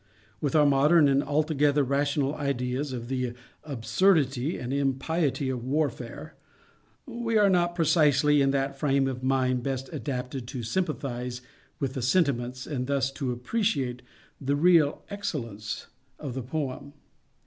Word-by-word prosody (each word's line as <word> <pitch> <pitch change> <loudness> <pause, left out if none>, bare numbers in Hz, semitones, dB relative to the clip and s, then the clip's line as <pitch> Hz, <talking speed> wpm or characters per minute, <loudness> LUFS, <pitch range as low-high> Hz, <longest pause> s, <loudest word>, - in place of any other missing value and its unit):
With 145 0 -1
our 150 -1 +6
modern 145 +3 +5
and 140 0 +3
altogether 145 -1 +2
rational 140 +1 0
ideas 140 -1 -2
of 120 -2 -5
the 125 -2 -2 0.3
absurdity 140 - +1
and 125 +1 -4
impiety 140 +1 0
of 125 -2 -3
warfare, 145 +1 -2 0.7
we 235 -3 -1
are 205 -2 +5
not 175 -1 +2
precisely 150 -3 +4
in 135 - +3
that 135 0 -1
frame 135 -2 +2
of 130 -1 -4
mind 130 -1 +1
best 135 0 -4
adapted 125 -2 -4
to 125 -2 -5
sympathize 125 -4 -3 0.4
with 135 -2 -2
the 135 - -3
sentiments, 125 -3 +1
and 125 -4 -3
thus 135 -1 +1
to 135 -2 -3
appreciate 125 - -1 0.4
the 140 +1 0
real 160 -1 +4
excellence 115 - -4 0.3
of 140 -5 -6
the 130 - -3
poem. 140 +1 -4
140 Hz, 135 wpm, -27 LUFS, 125-150 Hz, 0.7 s, our